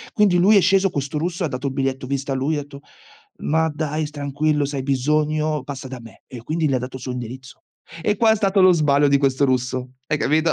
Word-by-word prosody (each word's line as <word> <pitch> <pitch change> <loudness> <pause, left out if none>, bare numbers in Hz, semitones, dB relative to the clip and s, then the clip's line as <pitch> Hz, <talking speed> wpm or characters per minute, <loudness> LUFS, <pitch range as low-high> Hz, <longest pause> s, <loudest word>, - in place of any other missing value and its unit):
Quindi 205 -4 +4
lui 205 +4 +5
è - - +7
sceso, 195 +1 +3
questo 140 -1 -4
russo, 175 +3 -3
e - - +1
ha - - -2
dato 140 +1 -3
il - - -5
biglietto 135 -1 -2
vista 140 +1 -3
a - - 0
lui, 135 +4 -1
etto: 145 -1 -7 0.6
"Ma 160 +1 +1
dai 155 0 -2
tranquillo, 145 0 -1
se 140 0 -5
hai 135 - -2
bisogno 150 +3 0
passa 135 -1 -7
da 130 -1 -8
me" 115 -1 -15
e - - -10
io 115 - -9
"Quindi 155 +3 0
le 135 - +1
ha - - +1
dato 125 +1 -6
il 130 - -10
suo 130 - -4
indirizzo?" 125 +1 -8 0.4
E 210 +4 +1
qua 225 +2 +4
è 220 - +4
stato 195 -1 +2
lo 185 0 +7
sbaglio 145 -3 +3
di 140 0 +4
questo 135 0 +2
russo. 130 0 -1
Hai 155 -1 0
capito? 155 +2 +2
145 Hz, 250 wpm, -21 LUFS, 135-160 Hz, 0.6 s, è